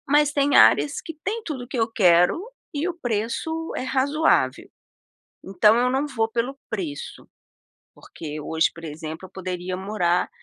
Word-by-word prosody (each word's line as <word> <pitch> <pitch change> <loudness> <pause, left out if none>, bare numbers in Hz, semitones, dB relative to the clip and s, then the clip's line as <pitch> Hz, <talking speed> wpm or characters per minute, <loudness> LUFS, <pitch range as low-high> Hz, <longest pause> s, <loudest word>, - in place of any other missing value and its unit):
Mas 295 +1 +4
tem 285 -1 +2
áreas 290 - +5
que 325 - -8
tem 445 +3 -2
tudo 275 -6 -4
o - - -11
que 250 - -5
eu 225 0 0
quero 180 - +4 0.3
e 300 +4 -1
o 360 - -2
preço 320 +4 -3
é - - -2
razoável. 275 +5 +1 0.7
Então 195 +3 +4
eu 250 +1 +2
não 265 +3 0
vou 225 -6 0
pelo 240 +4 -2
preço, 165 -10 -5 0.7
porque 155 -1 -8
hoje, 160 +2 +1
por 165 - -12
exemplo, 160 +2 -7
eu - - -24
poderia 185 -1 -5
morar 185 -3 0
225 Hz, 160 wpm, -24 LUFS, 180-285 Hz, 0.7 s, áreas